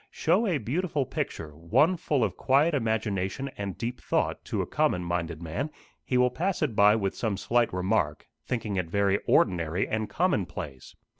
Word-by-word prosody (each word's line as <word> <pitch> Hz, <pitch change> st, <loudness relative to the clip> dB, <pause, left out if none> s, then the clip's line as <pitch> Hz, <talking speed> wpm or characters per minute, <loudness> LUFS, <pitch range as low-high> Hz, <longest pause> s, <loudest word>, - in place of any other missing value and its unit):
Show 190 Hz, +8 st, +1 dB
a 175 Hz, -6 st, +1 dB
beautiful 145 Hz, -, -1 dB
picture, 75 Hz, -9 st, -4 dB
one 85 Hz, -, +3 dB
full 145 Hz, -6 st, 0 dB
of 100 Hz, -, -1 dB
quiet 145 Hz, +5 st, +3 dB
imagination 110 Hz, 0 st, -1 dB
and 100 Hz, -2 st, -5 dB
deep 120 Hz, +1 st, -4 dB
thought, -, -, -1 dB
to -, -, -1 dB
a -, -, -4 dB
common 90 Hz, -, +1 dB
minded 85 Hz, -1 st, -3 dB
man; 85 Hz, -, -3 dB, 0.3 s
he 125 Hz, -, 0 dB
will 125 Hz, 0 st, +4 dB
pass 180 Hz, +5 st, -1 dB
it 130 Hz, -8 st, -1 dB
by 105 Hz, +1 st, +6 dB
with 100 Hz, -3 st, -1 dB
some 110 Hz, -4 st, -1 dB
slight 120 Hz, +3 st, +1 dB
remark, 90 Hz, -4 st, 0 dB, 0.2 s
thinking 110 Hz, -5 st, -2 dB
it 90 Hz, -3 st, -1 dB
very 100 Hz, +1 st, +2 dB
ordinary 85 Hz, -1 st, +2 dB
and 110 Hz, 0 st, -2 dB
commonplace. 90 Hz, -, -2 dB
110 Hz, 170 wpm, -27 LUFS, 90-135 Hz, 0.3 s, by